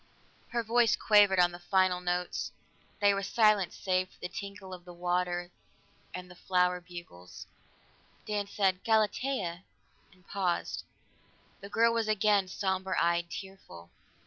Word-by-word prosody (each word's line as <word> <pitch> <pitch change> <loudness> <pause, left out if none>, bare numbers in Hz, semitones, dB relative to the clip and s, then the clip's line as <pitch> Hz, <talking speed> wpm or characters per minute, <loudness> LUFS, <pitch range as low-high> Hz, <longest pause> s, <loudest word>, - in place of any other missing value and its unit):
'" - - -32
Her 235 -1 0
voice 230 0 +3
quavered 205 -3 +5
on 175 0 +5
the 175 - -9
final 185 0 +2
notes; 180 0 -2 0.5
there 205 -1 +4
was 195 0 -3
silence 215 -4 +3
save 185 -1 0
for - - -24
the - - -5
tinkle 200 -1 -8
of 180 -1 -11
water 175 0 -2 0.6
and 180 0 -7
the 180 - -13
flower 180 0 +1
bugles. 90 - -11 0.8
Dan 205 -1 -2
said, 190 -2 0
"Galatea 215 -4 0 0.2
" - - -35
and 185 -1 -25
paused. 185 -3 -2 0.7
The 200 - -10
girl 230 +2 +3
was 230 -1 0
again 210 -2 +3
somber 190 0 -2
eyed, 170 0 +1
tearful. 170 - -10
185 Hz, 145 wpm, -30 LUFS, 180-205 Hz, 0.8 s, quavered